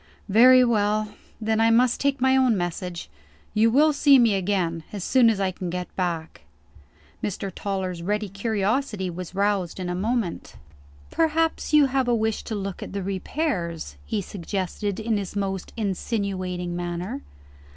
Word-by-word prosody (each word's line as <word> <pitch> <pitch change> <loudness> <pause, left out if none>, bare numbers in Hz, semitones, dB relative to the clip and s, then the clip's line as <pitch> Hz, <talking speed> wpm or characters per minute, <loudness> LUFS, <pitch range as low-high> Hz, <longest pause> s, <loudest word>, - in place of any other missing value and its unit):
"Very 250 +5 +7
well. 215 -2 +1 0.3
Then 220 0 +1
I 225 - +5
must 240 +1 +3
take 280 -1 +1
my 265 +1 +4
own 255 -5 +3
message. 175 0 -4 0.5
You 220 +2 +4
will 300 +6 +4
see 285 -1 +6
me 235 -4 +4
again, 180 -4 -1
as 200 -4 -5
soon 245 +1 +5
as 215 -3 0
I 190 -1 +1
can 180 -1 -5
get 180 0 -5
back." 170 - -3 0.8
Mr. 195 -1 -3
Toller's 190 -3 -3
ready 210 +4 -1
curiosity 205 0 -1
was 180 +1 -7
roused 200 -3 0
in 180 -1 -3
a - - -1
moment. 210 -1 -2 0.6
"Perhaps, 325 0 +1
you 300 -1 +6
wish 245 -5 +1
to 220 - -3
have - - -3
a - - -2
look 195 - -7
at - - -7
the 200 -1 -3
repairs?" 185 - -3
he 205 -2 -2
suggested 195 +2 -3
in 220 -1 0
his 200 -1 -5
most 195 -2 -3
insinuating 185 -4 -2
manner. 175 +9 -4
205 Hz, 160 wpm, -24 LUFS, 185-235 Hz, 0.8 s, Very